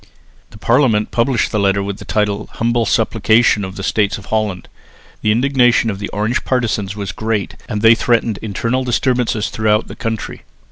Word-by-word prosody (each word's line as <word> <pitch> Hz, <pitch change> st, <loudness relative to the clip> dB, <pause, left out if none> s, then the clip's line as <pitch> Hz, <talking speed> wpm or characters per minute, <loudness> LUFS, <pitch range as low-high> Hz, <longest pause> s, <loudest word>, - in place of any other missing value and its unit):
The 105 Hz, -, -14 dB
Parliament 115 Hz, -2 st, +2 dB
published 120 Hz, 0 st, +1 dB
the 105 Hz, -, 0 dB
letter 100 Hz, 0 st, +1 dB
with 100 Hz, 0 st, -4 dB
the -, -, -10 dB
title 105 Hz, 0 st, -1 dB
"Humble 115 Hz, -1 st, 0 dB
Supplication 110 Hz, 0 st, +2 dB
of 95 Hz, 0 st, -6 dB
the 100 Hz, -, -6 dB
States 100 Hz, 0 st, 0 dB
of 100 Hz, -, -12 dB
Holland." 105 Hz, -5 st, -1 dB, 0.5 s
The 105 Hz, -, +2 dB
indignation 120 Hz, -1 st, +3 dB
of 100 Hz, -, -7 dB
the 100 Hz, -, -4 dB
Orange 110 Hz, +4 st, -1 dB
partisans 110 Hz, -6 st, -1 dB
was 100 Hz, -2 st, -4 dB
great, 110 Hz, -2 st, -3 dB
and 105 Hz, 0 st, -3 dB
they 115 Hz, 0 st, +8 dB
threatened 115 Hz, -2 st, 0 dB
internal 115 Hz, +4 st, -2 dB
disturbances 120 Hz, -4 st, 0 dB
throughout 110 Hz, 0 st, +1 dB
the -, -, -9 dB
country. 115 Hz, -1 st, -4 dB
110 Hz, 175 wpm, -17 LUFS, 105-120 Hz, 0.5 s, they